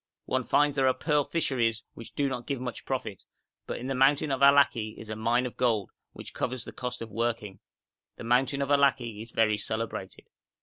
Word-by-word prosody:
One 130 0 0
finds 145 +3 +2
there 135 -2 +4
pearl 150 -2 +1
fisheries 120 -9 0
which 115 - -12
do 145 -1 +1
not 125 -3 -4
give 140 -3 -2
much 125 -1 -6
profit, 115 -7 -4 0.5
but - - -3
in 125 - -7
the 135 - -1
mountain 140 +3 +3
of 135 - -1
Allaki 140 -6 +4
is 110 -1 -8
a - - -3
mine 120 +3 +1
of 125 - -5
gold, 115 -5 +1 0.2
which - - -10
covers 125 -2 -3
the - - -8
cost 125 -2 -4
of 115 - -10
working. 115 -3 -2 0.6
The - - -8
mountain 130 +4 +2
of 140 - -4
Allaki 135 -6 +2
is 115 - -9
very 110 -2 +2
celebrated.' 110 -3 -5
125 Hz, 200 wpm, -28 LUFS, 115-135 Hz, 0.6 s, there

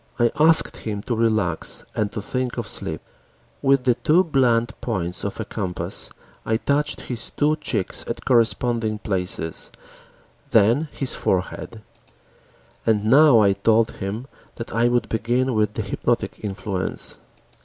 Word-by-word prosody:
I 120 -1 +3
asked 160 +1 +4
him 105 -2 -5
to 120 - -2
relax 110 -7 0
and 105 -1 0
to 105 - -5
think 130 +2 -3
of - - -3
sleep. - - -4 0.6
With 135 -1 +3
the 125 -1 +4
two 160 +9 +3
blunt 125 -7 +2
points 90 -6 -2
of 100 - -4
a 110 - -3
compass, 95 -5 -3 0.3
I 110 - +1
touched 145 +4 0
his 120 -2 -4
two 150 +1 +1
cheeks 110 - -2
at - - -5
corresponding 115 -2 +2
places, 90 -5 -2 0.8
then 115 +9 +3
his 135 - +1
forehead. 95 +4 -2 1.0
And 105 -2 +1
now 135 0 +7
I 100 -1 +4
told 110 +3 +2
him 100 +6 -5 0.3
that 115 - -7
I 115 +2 +3
would 120 0 +1
begin 120 +4 0
with 105 -1 +1
the - - -2
hypnotic - - -1
influence. 95 -2 -2
115 Hz, 145 wpm, -23 LUFS, 105-125 Hz, 1.0 s, now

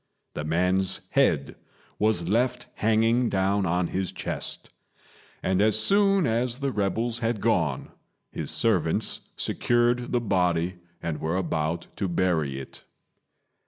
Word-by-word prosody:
The 75 - -4
man's 90 +4 +1
head - - +2 0.4
was 105 -6 +1
left 125 +5 +1
hanging 115 +2 +2
down 95 0 +1
on 90 +1 0
his 95 0 -2
chest; - - -4 0.7
and 95 +1 +1
as 110 0 +4
soon 195 - +3
as 120 +2 0
the 140 -1 -1
rebels 115 +3 -1
had 115 -1 -1
gone, 85 - 0 0.4
his - - -4
servants - - +1
secured 120 +1 +1
the 120 - +2
body 90 -4 0 0.2
and 80 -3 -3
were 80 +3 -1
about 85 -2 -1
to 100 - -1
bury 85 -7 0
it. 65 - -10
100 Hz, 125 wpm, -26 LUFS, 85-120 Hz, 0.7 s, as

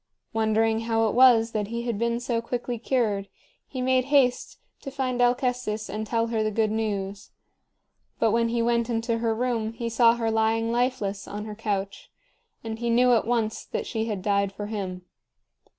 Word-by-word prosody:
Wondering 220 0 +2
how 225 0 +2
it - - -1
was 235 -2 +6
that 210 -2 -2
he 235 +2 -4
had 235 -4 -2
been 235 0 0
so 240 -1 -1
quickly 240 0 -4
cured, 215 -6 0 0.4
he 255 -2 -4
made 255 0 +2
haste 270 -3 +2 0.2
to 275 - -6
find 260 -2 -2
Alcestis 245 -3 0
and 215 0 -4
tell 230 +1 +1
her 220 - +1
the 215 - +1
good 215 0 0
news. 205 -2 -3 0.9
But 225 - +2
when 230 +1 +2
he 235 0 0
went 235 0 +1
into 230 0 -1
her 225 -1 0
room, 230 -2 -1
he 230 0 -4
saw 230 0 +4
her 225 -1 -1
lying 225 +1 +1
lifeless 235 -5 -1
on 210 +1 -6
her 215 - -6
couch, 200 -2 -4 0.5
and 225 0 -5
he 235 0 -1
knew 245 +1 +4
at 225 -1 +2
once 225 -2 0
that - - -4
she 225 -2 -2
had 205 -5 -4
died 200 -1 +1
for 205 +1 -6
him. 190 -4 -5
225 Hz, 185 wpm, -26 LUFS, 215-240 Hz, 0.9 s, was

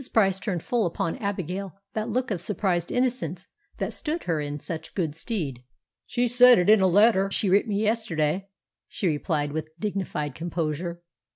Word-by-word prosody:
Price 195 -4 +3
turned 185 -6 -3
full 235 -6 +1
upon 165 0 -2
Abigail 195 - -3 0.2
that 220 +1 -2
look 250 +2 -1
of 180 -5 -1
surprised 180 -3 -1
innocence 235 - -1 0.3
that - - -2
stood 325 +2 -3
her 165 -3 0
in 145 0 -3
such 160 +1 -7
good 165 -6 -1
stead. 160 - -3 0.5
"She 245 0 +1
said 245 +1 +7
it 180 +3 +4
in 215 -2 +6
a 190 - +5
letter 195 +1 +4
she 195 -1 0
writ 200 +5 +4
me 205 0 0
yesterday," 195 -5 0 0.4
she - - -4
replied 150 -2 0
with 155 +2 -6
dignified 185 -8 -2
composure. 170 +2 -3
190 Hz, 170 wpm, -26 LUFS, 165-215 Hz, 0.5 s, said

